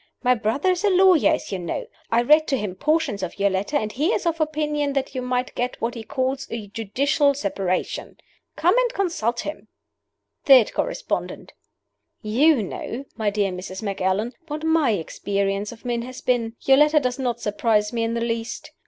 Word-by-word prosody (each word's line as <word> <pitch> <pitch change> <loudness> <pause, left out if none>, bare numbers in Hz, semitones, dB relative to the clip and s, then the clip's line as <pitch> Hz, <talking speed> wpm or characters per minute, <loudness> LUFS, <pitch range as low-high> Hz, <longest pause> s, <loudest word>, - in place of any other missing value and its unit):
My 250 0 +5
brother 235 - 0
is 365 +1 -2
a 415 - +4
lawyer, 370 -4 +5
as - - -4
you 190 - -2
know. 170 -2 -4 0.3
I 235 +1 +3
read 305 +5 +5
to 270 - +1
him 205 -5 -3
portions 295 - 0
of 185 -2 -5
your 200 0 +2
letter, 200 +10 0
and 215 -5 -2
he 290 +8 0
is - - -2
of 330 -1 0
opinion 300 -2 -1
that 275 -1 -2
you 255 - -3
might 250 0 -2
get 250 +1 -3
what 235 +1 -2
he 230 - -6
calls 260 +3 -2
a 230 -2 -5
judicial 275 +7 +1
separation. 195 -6 -2 0.4
Come 355 +6 +3
and - - +1
consult 285 - -1
him." 300 - -7 0.8
THIRD 260 -6 +7
CORRESPONDENT: - - -3 0.7
"YOU 250 +4 +3
know, 235 +7 -6
my 215 -3 0
dear 200 -1 0
Mrs. 185 +2 -7
Macallan, 200 +3 -1
what 305 0 -5
my 320 -4 +3
experience 200 +1 -1
of 235 +1 -14
men 240 -1 -1
has 255 +2 -8
been. 235 -2 0
Your 270 0 +5
letter 300 +1 +5
does 250 -1 -2
not 245 -3 -1
surprise 210 0 0
me 230 - -1
in 230 +1 -1
the 235 - -1
least. 230 0 -3
245 Hz, 190 wpm, -23 LUFS, 210-295 Hz, 0.8 s, THIRD